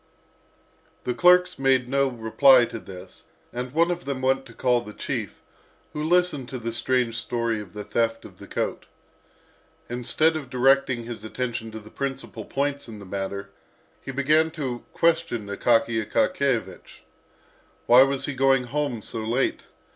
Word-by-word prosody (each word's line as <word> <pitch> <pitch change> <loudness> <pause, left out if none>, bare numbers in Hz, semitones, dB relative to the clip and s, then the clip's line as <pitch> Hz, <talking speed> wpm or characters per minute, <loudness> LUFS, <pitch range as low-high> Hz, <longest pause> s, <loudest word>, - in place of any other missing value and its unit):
The 125 - -1
clerks 180 +3 +5
dared 135 -1 +3
make - - -17
no 140 +1 +2
reply 125 +2 +5
to 115 - -7
this, 90 -2 -12 0.3
and 125 +1 -4
one 170 +4 +2
of 175 0 -4
them 135 -2 -4
went 135 +1 +1
to 115 - -14
call 125 -2 +2
the 105 - -10
chief, - - -5 0.5
who 150 - -4
listened 160 -5 +1
to 130 - -5
the 115 -1 -4
strange 120 -1 0
story 115 -2 -2
of 95 -4 -12
the 105 - -6
theft 115 +2 -1
of - - -14
the - - -11
coat. - - -3 1.0
Instead 125 +7 +1
of 145 -5 -5
directing 130 -1 +2
his 115 -2 -8
attention 115 0 -4
to 110 0 -8
the 110 0 -15
principal 135 -1 -5
points 140 0 -2
of 110 -2 -9
the 100 - -11
matter, 100 +1 -5 0.5
he - - -10
began 155 +4 +3
to 135 -7 -5
question 165 -9 +1
Akaky 115 +2 +1
Akakiyevich. 130 - -1 0.8
Why 125 +2 +8
was 135 0 +2
he 145 - -3
going 135 0 +3
home 125 -3 -3
so 115 -2 -5
late? 120 +4 -1
125 Hz, 160 wpm, -25 LUFS, 115-140 Hz, 1.0 s, Why